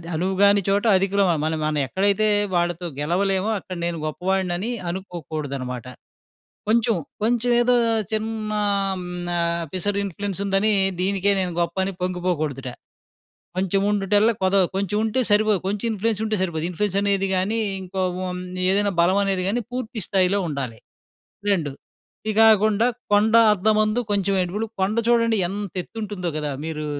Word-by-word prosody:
అది 165 - -12
'అనువుగాని 195 +4 +3
చోట 200 +2 +2
అధికులమా' 195 -2 +2
మన 160 - 0
మనం 155 -1 0
ఎక్కడైతే 200 +8 +1 0.3
వాళ్ళతో 175 0 0
గెలవలేమో 190 +6 0
అక్కడ 185 -1 -8
నేను 170 -1 -1
గొప్పవాడినని 185 +5 -1 0.2
అనుకోకూడదనమాట. 150 - -5 0.8
కొంచం, 225 -1 +3 0.3
కొంచవేదో 240 +1 +3 0.4
చిన్నా 215 -1 -2 0.3
ఆహ్, 190 - -2
హ్మ్, 180 0 -6 0.2
న - - -2 0.4
పిసరిన్‌ఫ్లుయెన్సుందనీ, 200 +1 -1 0.3
దీనికే 195 +1 +1
నేను 180 -1 -2
గొప్పని 190 +3 -1
పొంగిపోకూడుదట. 175 -7 -2 0.9
'కొంచెవుండుటల్ల 200 +3 +2
కొదవ' 190 0 +4
కొంచెవుంటే 210 +5 0
సరిపోదు, 210 -1 +3
కొంచెం 205 +3 -2
ఇన్‌ఫ్లుయెన్సుంటే 220 +1 -1
సరిపోదు. 165 -4 -2
ఇన్‌ఫ్లుయెన్సనేది 200 +1 0
గానీ, 205 +5 0 0.2
ఇంకో 185 +1 -3 0.2
ఓ - - -3
మ్ - - -6 0.3
ఏదైనా 200 +1 +1
బలవనేది 190 +1 +2
గానీ 240 +4 0
పూర్తి 245 -2 -4
స్థాయిలో 195 0 +2
ఉండాలి. 130 -6 -4 0.7
2 165 -7 0 0.6
ఇగాకుండా, 220 0 +5 0.3
'కొండ 215 +2 +4 0.2
అద్దమందు 215 +3 +2
కొంచెం 200 -1 +1
ఎడుపులు', 210 +5 -3
కొండ 200 +4 +1
చూడండి 230 -2 +3
ఎంతెత్తుంటుందో 200 -1 -4
గదా! 150 -1 -2
మీరూ 155 -1 -4
195 Hz, 120 wpm, -23 LUFS, 180-210 Hz, 0.9 s, ఇగాకుండా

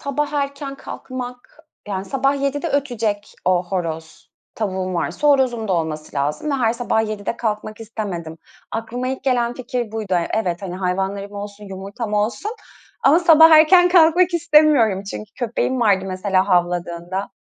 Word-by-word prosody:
sabah 290 0 -2
erken 280 -1 -3
kalkmak, 250 -1 -8 0.3
yani 190 -1 -3
sabah 270 +5 0
07.00'de 285 +3 -1
ötecek 235 -8 -2
o 180 0 +2
horoz. 165 -4 -5 0.2
Tavuğum 190 -3 -3
varsa 290 - 0
horozum 245 -6 +2
da - - +1
olması 155 -3 -3
lazım 150 - -1
ve - - +1
her 235 -4 +2
sabah 225 -2 0
07.00'de 215 +2 -4
kalkmak 215 -1 -3
istemedim. 185 -8 -6 0.3
Aklıma 240 +3 -3
ilk 265 - -4
gelen 245 -2 +1
fikir 245 -3 -4
buydu. 215 -4 -2
E 170 -1 0
evet 185 -4 -1
hani 180 -2 -5
hayvanlarım 195 +2 -2
olsun, 205 0 -8
yumurtam 200 +3 -6
olsun 215 - -1 0.5
ama 310 +5 +6
sabah 325 -2 +7
erken 325 +3 +7
kalkmak 350 0 +5
istemiyorum. 300 - +4
çünkü 215 - -7
köpeğim 245 +1 -1
vardı 200 -4 +3
mesela 190 +1 0
havladığında 175 +1 -1
220 Hz, 150 wpm, -20 LUFS, 190-275 Hz, 0.5 s, sabah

